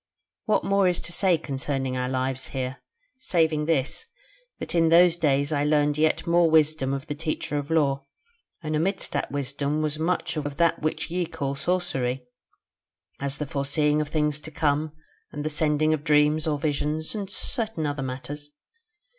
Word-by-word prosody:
What 215 - +2
more 195 -1 +3
is 180 -1 +1
to - - -6
say 185 -3 +3
concerning 135 -3 -3
our 125 0 -1
lives 130 0 -1
here, 130 0 -4 0.4
saving 160 -9 +1
this, 160 - 0 0.5
that - - -5
in 165 -1 +4
those 170 +1 +6
days 145 -3 +1
I 145 -1 +1
learned 150 0 +2
yet 155 +1 +1
more 170 0 +4
wisdom 155 -3 +3
of 135 +1 -3
the 150 - -4
Teacher 150 -1 -3
of 145 +1 -7
Lore, 140 -4 +1 0.6
and 155 0 -2
amidst 185 +5 0
that - - -2
wisdom 145 +2 -2
was 155 0 -2
much 170 0 -1
of 145 -1 -4
that 170 -1 +2
which 155 +1 -2
ye 175 -1 -1
call 145 -5 -3
sorcery: 135 -6 -1 0.9
as 140 0 -2
the 150 - -3
foreseeing 150 +1 +1
of 150 - -4
things 150 -1 0
to 155 - -9
come, 155 -1 0 0.4
and 145 +1 -5
the 155 - -1
sending 155 0 +2
of 150 -2 -2
dreams 150 0 +3
or 150 -2 +1
visions, 150 +1 -1
and 205 -3 -4
certain 220 - 0
other 145 -1 -2
matters. 135 +3 -6
150 Hz, 170 wpm, -25 LUFS, 140-160 Hz, 0.9 s, those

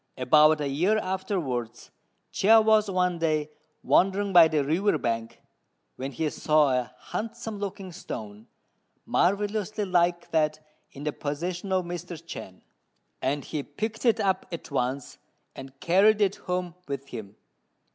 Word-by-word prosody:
About 150 +4 +5
a 145 - -1
year 175 +10 +2
afterwards 180 - -3 0.4
Chia 225 +3 +5
was 215 -1 +3
one 180 -2 0
day 155 -2 0 0.3
wandering 195 +1 +2
by 170 -2 +9
the 155 -2 0
river 165 +6 +1
bank, 115 -3 -3 0.6
when 135 +1 -5
he 155 +5 -2
saw 150 -2 +3
a 125 -3 -1 0.2
handsome 225 -1 -4
looking 195 -2 -5
stone, 110 - -8 0.6
marvellously 205 +2 0
like 175 -2 +1
that 155 -1 +1 0.3
in 140 - -10
the 150 -1 -2
possession 175 +6 -4
of 185 -1 +1
Mr. 175 0 -6
Chên; 95 - -9 0.6
and 140 +2 -1
he 150 - -3
picked 220 +8 -5
it 230 -2 +3
up 195 -3 0
at 170 -2 -7
once 130 0 -2 0.4
and 135 0 -11
carried 195 +5 +4
it 200 -2 +2
home 180 -1 -3
with 140 -1 -5
him. 105 -4 -8
170 Hz, 140 wpm, -27 LUFS, 140-195 Hz, 0.6 s, by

